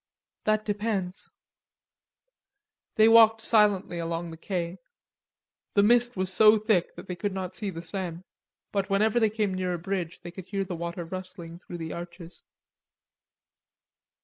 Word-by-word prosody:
"That 215 0 +1
depends." 205 -3 -2 1.7
They 220 0 +6
walked 225 -1 +7
silently 205 -6 +3
along 165 0 -3
the - - -8
quais. 175 0 -4 1.0
The 200 - +5
mist 240 +1 +3
was 185 0 0
so 215 +1 +7
thick 210 -5 +1
they 180 - -7
could 200 +4 -2
not 185 -1 -5
see 200 +3 -3
the 165 -2 -7
Seine, 180 -2 -5 0.5
but 200 0 -1
whenever 215 +4 +3
they 220 -2 +3
came 210 -2 -1
near 185 -1 -1
a - - -4
bridge 175 -1 -4
they 175 - -8
could 185 0 -10
hear 195 0 -2
the 180 -2 -5
water 170 +1 -5
rustling 185 -1 -8
through 175 -1 -9
the 160 -1 -5
arches. 170 0 -9
185 Hz, 145 wpm, -27 LUFS, 175-210 Hz, 1.7 s, walked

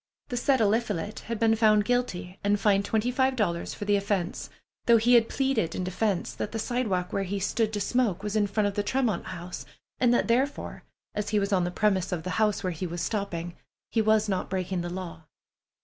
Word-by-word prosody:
The 245 - -2
said 265 +2 +2
Eliphalet 210 -2 0
had 230 - -1
been 225 0 +3
found 215 -2 +4
guilty 200 -7 -1
and 205 0 +2
fined 200 -1 +3
twenty 220 +3 0
five 260 +1 +2
dollars 175 -7 -1
for 205 - -5
the 205 0 +3
offense, 200 -3 -2 0.4
though 235 -1 +7
he 235 +3 +3
had 230 -2 +5
pleaded 265 -11 0
in 185 - -2
defense 190 +1 -1
that - - -4
the - - -1
sidewalk 215 -6 -1
where 195 - 0
he 195 +1 -2
stood 215 +3 0
to 205 - -1
smoke 205 -3 0
was 210 0 -3
in 210 -1 +3
front 205 +1 0
of 205 - 0
the 205 - 0
Tremont 225 -3 0
House, 180 0 -6 0.4
and 245 -2 +4
that 240 - +2
therefore, 260 +5 0 0.3
as 210 0 -2
he 210 -1 +2
was 200 0 -1
on 180 -2 +3
the - - -1
premises 190 -1 +1
of 165 -2 -3
the 185 - -3
house 210 -2 +2
where 185 -1 -1
he 180 +3 -4
was 170 +1 -4
stopping, 175 -5 -3 0.4
he 225 - +2
was 215 0 +3
not 190 -3 -1
breaking 185 -1 -2
the 175 - -4
law. 170 -3 -7
205 Hz, 220 wpm, -27 LUFS, 185-225 Hz, 0.4 s, though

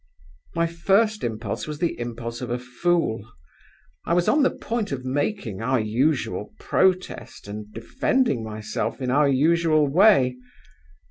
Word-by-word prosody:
"My 170 0 +2
first 200 +6 +1
impulse 110 +5 -3
was 150 -1 -5
the 170 -3 -1
impulse 120 0 -5
of 125 - -4
a 120 - -1
fool. 125 - -1 0.8
I 170 - 0
was 175 0 +2
on 300 - +4
the 275 - +4
point 225 -5 -3
of 130 -2 -4
making 130 - -2
our 130 +2 +1
usual 110 -3 -1
protest 185 - 0
and 105 +1 -7
defending 255 - 0
myself 110 +2 -4
in 130 -2 -2
our 145 +1 +4
usual 155 +2 +3
way. 140 -6 +4
140 Hz, 140 wpm, -24 LUFS, 115-175 Hz, 0.8 s, on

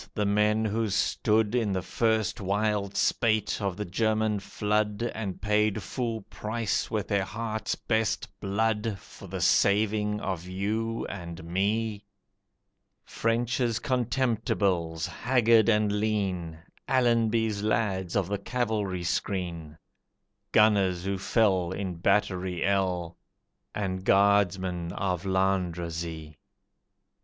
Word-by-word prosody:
the 105 - 0
men 105 +2 +2
who 110 +1 0
stood 105 +2 +1
In 115 -5 +1
the 95 -1 -1
first 110 +1 0
wild 100 0 0
spate 110 -2 +1
of 100 -2 -2
the 105 - -3
German 110 +2 +1
flood, 105 +2 -1
And 100 -5 -4
paid 105 0 +1
full 115 +1 -3
price 110 0 -2
with 110 -3 -2
their 100 -2 +1
heart's 110 +1 -3
best 110 -1 -1
blood 105 +1 0
For - - -13
the - - -5
saving 105 +1 +2
of 90 -3 -4
you 110 +5 -2
and 85 -4 -7
me: 105 +4 -1 1.0
French's 120 0 0
Contemptibles, 105 - 0
haggard 115 -3 +3
and 105 -1 +3
lean, 100 -6 -1 0.3
Allenby's 115 -4 +2
lads 100 -4 0
of 100 -4 +1
the 100 0 -2
cavalry 105 -6 -2
screen, 85 -3 -3 0.7
Gunners 95 -4 +3
who 100 -1 -1
fell 95 -4 +2
in 95 -1 -3
Battery 95 -1 +1
L, 90 -3 0 0.6
And 95 -2 -2
Guardsmen 95 -3 +2
of 90 -1 -2
Landrecies? 85 -4 -1
105 Hz, 110 wpm, -28 LUFS, 95-110 Hz, 1.0 s, haggard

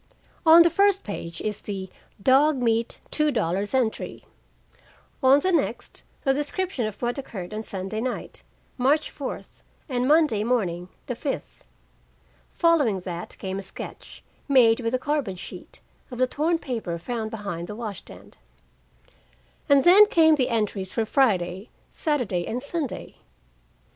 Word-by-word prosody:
On 330 +1 +10
the 335 - +3
first 400 -1 +3
page 170 -5 -6
is 210 -1 -3
the 195 -2 -5 0.3
"dog 275 +7 +4
meat 230 -1 0
two 305 0 +2
dollars" 200 - -1
entry. 240 -4 -1 1.0
On 265 +1 +6
the 375 - +1
next, 340 - -1 0.2
the 270 - +3
description 295 - -2
of 215 - -8
what 240 +3 -1
occurred 200 -8 -7
on 215 - -3
Sunday 195 +1 -4
night, 255 +1 -4 0.4
March 285 +5 +2
fourth, 280 -3 -7 0.3
and 250 -3 -1
Monday 295 -9 +4
morning, 185 -7 -1 0.2
the 250 - -3
fifth. 270 +4 -5 0.9
Following 290 - +2
that 175 -1 -7
came 190 0 -4
a - - -4
sketch, 195 - -7 0.2
made 245 -5 +5
with 235 0 -1
a - - +2
carbon 275 -7 -2
sheet, 175 - -10 0.3
of 250 - -8
the 255 - +3
torn 315 +6 0
paper 225 - -4
found 220 +4 -4
behind 200 -6 -5
the 210 - -6
wash 215 -3 -5
stand: - - -15 1.3
And 280 -1 +6
then 400 +4 +8
came 320 -4 +5
the 260 -4 +1
entries 210 -5 -1
for 225 - -1
Friday, 195 -6 +1 0.2
Saturday 245 - -1
and 240 - -2
Sunday. 295 -2 -4
240 Hz, 145 wpm, -25 LUFS, 200-290 Hz, 1.3 s, On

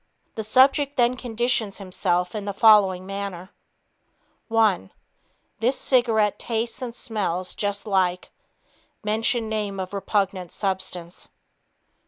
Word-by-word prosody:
The 220 - -4
subject 275 +5 +3
then 245 0 +3
conditions 240 -3 -1
himself 180 -2 -1
in 210 -2 -4
the 200 -1 -4
following 200 -4 +5
manner: 195 -1 -6 1.0
One... 215 - +2 0.7
This 245 +4 +1
cigarette 225 -5 +2
tastes 230 0 -3
and 240 -2 -5
smells 190 -7 -2
just 205 -1 -2
like 185 -3 0 0.7
(mention 220 +2 0
name 210 -3 -3
of 185 +1 -5
repugnant 195 -2 -1
substance). 185 -3 -4
205 Hz, 110 wpm, -24 LUFS, 190-225 Hz, 1.0 s, following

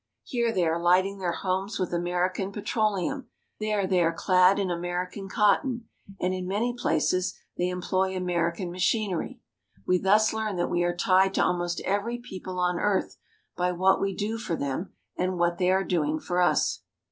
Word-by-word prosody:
Here 235 -2 0
they 185 -5 +1
are 165 +1 0
lighting 185 +3 +3
their 180 -2 -1
homes 190 +4 -2
with 185 -2 -2
American 180 +2 -1
petroleum, 215 +5 -1 0.3
there 215 -2 0
they 185 -1 +2
are 165 -1 +3
clad 185 +2 +4
in 195 -3 0
American 175 +3 -4
cotton, 230 +4 +2 0.3
and 180 +1 0
in 185 -1 -4
many 220 +6 0
places 185 -3 0 0.2
they 180 0 0
employ 185 +1 -1
American 175 0 -1
machin 195 +3 +1
ery. 230 +8 -4 0.4
We 180 0 +3
thus 210 +4 +3
learn 220 -2 -2
that 175 - -1
we 175 - +1
are 175 0 0
tied 190 +2 +3
to - - +3
almost 175 -1 0
every 205 +5 -1
people 185 -6 -8
on 180 -1 +1
earth 205 -2 0 0.4
by 180 0 0
what 190 +2 +3
we 195 -1 -1
do 220 +3 -2
for 175 -7 -2
them 140 +6 -3 0.3
and 185 0 -1
what 175 0 +1
they 180 -1 +2
are 190 +1 +3
doing 155 -4 0
for 180 +2 -1
us. 175 - +2
185 Hz, 180 wpm, -27 LUFS, 175-200 Hz, 0.4 s, clad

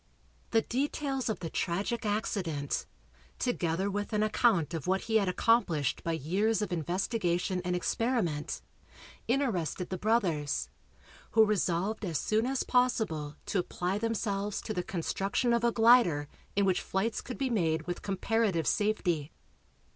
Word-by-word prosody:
The 225 -1 +3
details 270 0 -1
of 220 - -2
the 165 - -3
tragic 205 +6 -1
accident, 180 -9 -1 0.5
together 185 -6 0
with 205 +2 -3
an 210 0 +2
account 215 -6 +2
of 160 -2 -4
what 190 +1 +2
he 225 -1 +2
had 200 -3 +2
accomplished 180 - +2
by 165 - -1
years 200 +9 +1
of 205 - -3
investigation 180 - -1
and 180 0 0
experiment, 180 - -1 0.6
interested 215 - 0
the 185 - -3
brothers, 165 - 0 0.6
who 220 0 +7
resolved 205 0 0
as 170 -6 -1
soon 220 - +1
as 270 0 0
possible 220 - +1
to 200 - 0
apply 180 +2 -2
themselves 210 -3 -1
to 215 - -3
the 180 - -1
construction 195 +7 -1
of 235 0 +1
a 235 - +4
glider 225 -11 +5 0.3
in 200 0 +3
which 185 -2 +2
flights 220 +4 -1
could 255 - -7
be 270 -2 -1
made 165 -7 +1
with 175 +1 -4
comparative 195 -3 0
safety. 175 -8 0
200 Hz, 145 wpm, -30 LUFS, 170-225 Hz, 0.6 s, who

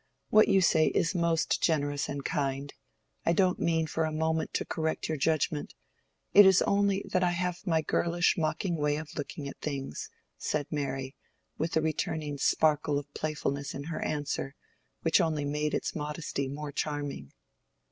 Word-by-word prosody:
What 215 0 +6
you 195 -1 +4
say 160 -3 +4
is 165 - +1
most 170 -2 +1
generous 145 -3 +1
and 140 -1 -4
kind; 140 0 -2 0.5
I 165 - +3
don't 185 0 +2
mean 165 -1 +1
for 160 +1 -1
a 160 - -1
moment 160 +1 0
to - - 0
correct 160 0 -2
your 155 - -1
judgment. 155 0 0 0.6
It 205 - +10
is 190 -1 +6
only 200 -1 +2
that 185 - +2
I 180 - +3
have 180 +2 -2
my 160 -2 +2
girlish, 170 +3 +2
mocking 170 +2 -1
way 150 -1 +1
of 155 0 -6
looking 145 -1 -5
at 140 - -9
things," 140 -3 -4 0.3
said 150 -1 -1
Mary, 135 -3 -3 0.4
with 160 +1 0
a - - +3
returning 155 -2 -2
sparkle 150 0 +2
of 145 0 -6
playfulness 145 -2 -2
in 140 - -5
her 160 +1 -4
answer 145 -2 -2 0.5
which 165 +3 +4
only 155 -3 0
made 150 +1 -1
its - - -2
modesty 150 -2 -3
more 145 +2 -5
charming. 145 - -3
155 Hz, 165 wpm, -29 LUFS, 145-165 Hz, 0.6 s, It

